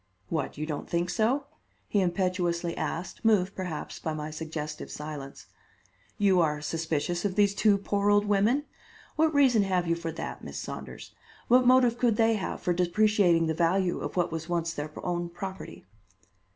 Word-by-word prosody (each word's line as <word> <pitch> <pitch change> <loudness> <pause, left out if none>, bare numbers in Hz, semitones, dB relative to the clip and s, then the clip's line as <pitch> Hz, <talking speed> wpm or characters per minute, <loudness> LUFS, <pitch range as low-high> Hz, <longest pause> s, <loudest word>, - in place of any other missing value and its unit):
What! 155 -4 -2
you 155 - -3
don't 150 -2 -5
think 170 +1 0
so?" 250 +6 +1 0.4
he 205 - +1
impetuously 175 -2 0
asked, 175 +2 -4
moved, 200 -4 +3
perhaps, 180 -5 -5
by 160 -1 -3
my 150 0 -5
suggestive 155 -1 -5
silence. 150 -2 -7 0.7
"You 195 -3 +4
are 150 -2 +1
suspicious 165 +2 -2
of 200 -3 -1
these 200 -1 +3
two 205 0 +3
poor 200 +1 0
old 205 0 +4
women? 210 +7 +2 0.5
What 315 0 +3
reason 265 -7 +4
have 185 -3 +1
you 170 - +1
for 165 -1 -4
that, - - -6
Miss - - -7
Saunders? - - -7 0.4
What 250 +1 +5
motive 250 -2 +5
could 240 -3 +3
they 225 +1 +3
have 205 -4 -3
for 180 - +1
depreciating 180 -1 +3
the 160 - 0
value 175 +3 +1
of - - -5
what 175 - +1
was 160 +1 -5
once 170 -1 -1
their 150 -1 -4 0.2
own 175 -1 -2
property?" 190 +2 -8
180 Hz, 170 wpm, -28 LUFS, 165-205 Hz, 0.7 s, What